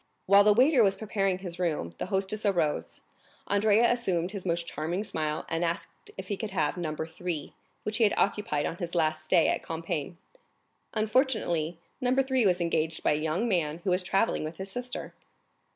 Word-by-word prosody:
While 200 +1 +7
the 210 - +6
waiter 260 +4 +5
was 195 -3 +4
preparing 195 -3 -1
his 180 -2 -7
room, 155 - -1
the - - -3
hostess 195 +2 -1
arose; 170 -7 0 0.4
Andrea 210 +3 +4
assumed 185 -7 0
his 195 -3 -6
most 170 0 0
charming 170 +5 -3
smile, 155 -6 -2
and 165 +1 -1
asked 170 - -3
if - - -6
he 200 - -1
could 220 - -4
have 185 -6 0
No. 165 -4 -3
3, 160 0 -4 0.3
which 215 +1 -2
he 230 - +3
had 205 - +2
occupied 195 -8 +1
on 170 - -3
his 175 0 -5
last 155 -2 +1
stay 165 +1 +4
at - - 0
Compiègne. 165 -1 -4 0.8
Unfortunately, 215 - +1 0.2
No. 250 0 +2
3 265 -4 +3
was 180 -1 +2
engaged 160 -2 0
by - - +3
a - - +3
young 160 +9 -1
man 165 -7 0
who 190 - 0
was 180 +1 +2
travelling 195 +2 +1
with 155 +1 -6
his 190 0 -5
sister. 245 +3 -5
180 Hz, 185 wpm, -28 LUFS, 165-210 Hz, 0.8 s, While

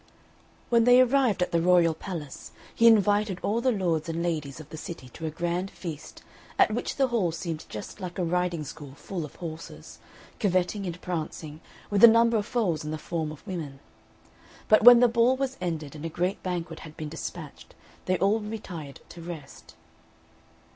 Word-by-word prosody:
When 235 -1 +4
they 245 0 +7
arrived 255 -6 +3
at - - -4
the 170 - +2
royal 175 -1 +4
palace, 160 -5 -8 0.2
he 230 - +4
invited 205 -3 +4
all 225 +3 0
the 255 +1 +2
lords 170 -7 -1
and 165 +1 -2
ladies 155 -5 -3
of 155 -1 -11
the - - -8
city 155 -4 -8
to 160 +5 -6
a - - -1
grand 175 +4 -2
feast, 165 -6 -8 0.3
at - - +5
which 240 - -3
the 270 -2 +2
hall 210 -8 +1
seemed 165 -1 -5
just 110 - -8
like 180 -1 -6
a 185 - 0
riding 175 -1 0
school 145 -2 -9
full 175 +2 -5
of 150 - -9
horses, 165 -1 -9 0.4
curveting 190 0 0
and 175 0 -5
prancing, 160 -2 -5 0.3
with 205 +1 +2
a - - +14
number 230 0 +5
of 210 0 -2
foals 185 -12 0
in 150 - -5
the 155 - -3
form 160 0 -3
of 155 - -12
women. 160 -9 -6 0.9
But 215 0 +5
when 245 0 +10
the 245 - +7
ball 235 +2 +3
was 270 -1 -2
ended, 160 -5 -4
and 150 - -9
a 165 - -3
great 180 +4 -2
banquet 175 -3 -4
had 155 -1 -12
been 155 -1 -5
despatched, 160 -1 -8 0.3
they 185 0 +1
all 200 +5 +2
retired 195 -9 -7
to 170 - -11
rest. 165 -5 -10
175 Hz, 190 wpm, -27 LUFS, 160-210 Hz, 0.9 s, a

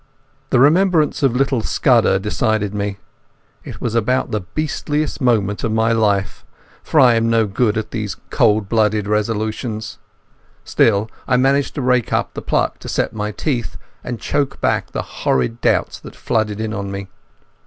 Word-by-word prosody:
The - - +3
remembrance 160 +2 +3
of 135 -4 +2
little 135 -2 +1
Scudder 95 - +3
decided 105 +1 -1
me. 100 -1 -3 0.7
It - - -9
was 120 - -3
about 120 +3 0
the 105 - 0
beastliest 150 +7 -3
moment 105 -5 +1
of 115 - 0
my 110 +1 +2
life, 105 -4 0 0.4
for 155 - +1
I'm 115 -3 +5
no 115 -1 +3
good 105 +2 0
at 110 0 -4
these 105 -3 -3 0.2
cold 110 -6 +2
blooded 105 -1 +1
resolutions. 110 +1 -2 0.7
Still 105 -1 +2 0.2
I 125 - +3
managed 135 +2 +1
to 145 - -3
rake 125 -2 +1
up - - -1
the - - -6
pluck - - -1
to - - -8
set - - -1
my 105 -1 -3
teeth 120 +1 -3 0.3
and 120 -2 -5
choke 145 -2 -1
back - - 0
the - - -3
horrid 110 - -1
doubts - - +1
that - - -12
flooded 110 -2 -1
in 110 0 -3
on 100 -2 -4
me. 100 0 -6
110 Hz, 165 wpm, -19 LUFS, 105-125 Hz, 0.7 s, I'm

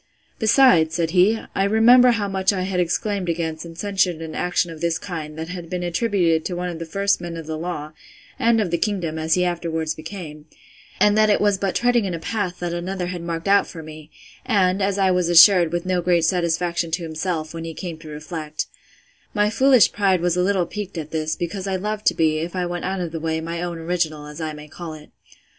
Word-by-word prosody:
Besides, 220 - +4
said 165 -1 0
he, 190 +5 +4
I 195 - +1
remember 235 +5 +6
how 220 -4 +1
much 190 0 +1
I 185 -2 -2
had 185 -1 -2
exclaimed 185 +2 -1
against 160 -1 -3
and 165 -1 -11
censured 195 -2 +1
an 160 -1 -7
action 180 -1 0
of 160 - -10
this 170 -1 0
kind, 160 -5 -7
that 160 +1 -5
had 175 -2 -7
been 180 0 -3
attributed 175 -3 +1
to 180 - -3
one 180 +1 -3
of 170 -2 -6
the 165 - -6
first 200 +3 0
men 170 -1 -6
of 165 - -7
the 160 0 -4
law, 155 -2 -5 0.5
and 230 -2 +3
of 195 -6 -1
the 170 - 0
kingdom, 170 -6 -2
as 160 0 +1
he 180 0 +2
afterwards 160 -2 -2
became; 155 -2 -9 0.5
and 210 0 +4
that 215 0 +4
it 205 - +3
was 205 -2 +2
but 195 -1 -1
treading 240 -2 +2
in 180 -3 -2
a - - -5
path 185 0 -3
that 175 -1 -2
another 180 +1 -3
had 175 - -6
marked 170 +1 -4
out 200 0 +4
for 165 -2 -9
me; 155 0 -11 0.3
and, 190 -1 +2
as 195 0 0
I 190 -1 +3
was 180 -1 +1
assured, 175 -1 +7
with 175 +1 -2
no 185 -1 0
great 175 -2 +2
satisfaction 170 -1 0
to 170 +2 -2
himself, 160 0 -3
when 165 0 -6
he 165 -1 -6
came 170 -4 -6
to 165 - -12
reflect; 150 0 -5 0.7
my 210 0 +2
foolish 260 0 +5
pride 195 -3 +2
was 175 0 +1
a 180 - +1
little 185 -1 +1
piqued 200 -1 -6
with 155 -1 -6
this, 155 -1 -1
because 185 +3 -4
I 190 - -1
loved 210 +2 -3
to - - +4
be, 155 -1 +2
if 170 +3 -5
I 180 -1 -1
went 175 0 -4
out 190 0 -2
of 170 -2 -4
the 165 - -4
way, 160 0 -1
my 165 +1 -4
own 175 -1 -4
original, 165 -3 -2
as 150 +2 -9
I 155 -1 -3
may 150 0 -10
call 160 +1 -8
it. 150 -1 -14
175 Hz, 235 wpm, -22 LUFS, 160-195 Hz, 0.7 s, assured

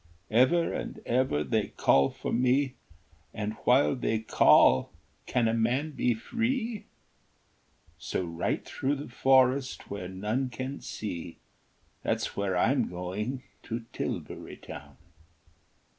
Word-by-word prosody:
Ever 130 +9 +4
and - - -5
ever 120 - +1
they 70 - 0
call 70 0 +3
for - - -5
me, 130 +2 +2 0.6
And 105 0 -2
while 130 +3 +4
they 115 -3 0
call 110 -10 +5 0.4
can 120 -2 +2
a 110 - +1
man 125 +7 +1
be 125 -4 +1
free? 230 - -2 1.1
So 95 - -2
right 85 0 -2
through 140 +2 -1
the 140 -2 -7
forest, 130 +1 +2
where 100 -3 -4
none 105 +8 -2
can 130 +2 -5
see, 85 -5 -6 0.6
There's - - -1
where 95 -2 0
I'm 125 +5 +2
going, 105 +9 -4 0.2
to 115 0 -5
Tilbury - - -5
Town." - - -10
125 Hz, 120 wpm, -29 LUFS, 105-135 Hz, 1.1 s, call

